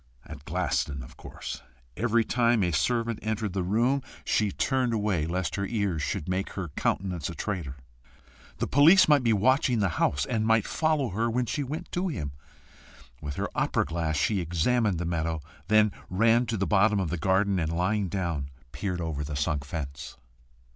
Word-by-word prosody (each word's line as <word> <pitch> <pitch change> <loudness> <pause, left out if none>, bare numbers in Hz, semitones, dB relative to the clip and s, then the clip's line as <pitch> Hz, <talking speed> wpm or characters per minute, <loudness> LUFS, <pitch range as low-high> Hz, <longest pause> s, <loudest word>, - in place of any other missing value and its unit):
At 75 -2 -10
Glaston, 70 -3 -1
of - - -13
course. - - -8 0.3
Every 115 0 +2
time 120 -2 +2
a 90 - +1
servant 115 +5 0
entered 110 -2 -2
the 95 - -1
room 120 +9 +1 0.2
she 105 -2 +1
turned 130 +1 0
away, 100 -7 0
lest 90 +3 -2
her 100 - -1
ears 100 -8 -1
should 75 - -3
make 95 +2 -2
her 90 -4 -4
countenance 90 +2 -2
a 85 - -6
traitor. 85 -8 -4 0.8
The - - -1
police 165 +8 +6
might 150 -2 +5
be 115 - +3
watching 125 +4 +3
the 100 -3 +2
house, 70 0 +2
and 110 -2 -1
might 110 -1 +3
follow 155 -5 0
her 110 +5 0
when 125 +2 0
she 145 - -2
went 150 +6 -5
to 180 +2 -1
him! 75 - -3 0.9
With 70 -2 -5
her - - -2
opera - - +1
glass, 80 -1 -2
she 100 +7 +1
examined 90 +5 +1
the 85 - -3
meadow, 80 -1 -1 0.3
then 110 0 +4 0.2
ran 115 +5 +3
to 110 0 -1
the 95 - 0
bottom 105 +1 +3
of 90 -5 -2
the 90 - -1
garden, 95 +3 +2
and 80 -1 -1
lying 95 +3 0
down, 85 -7 -2 0.2
peered 90 +3 -3
over 80 -3 -3
the 75 0 -5
sunk 75 0 -1
fence. 70 -2 -6
100 Hz, 180 wpm, -27 LUFS, 80-115 Hz, 0.9 s, police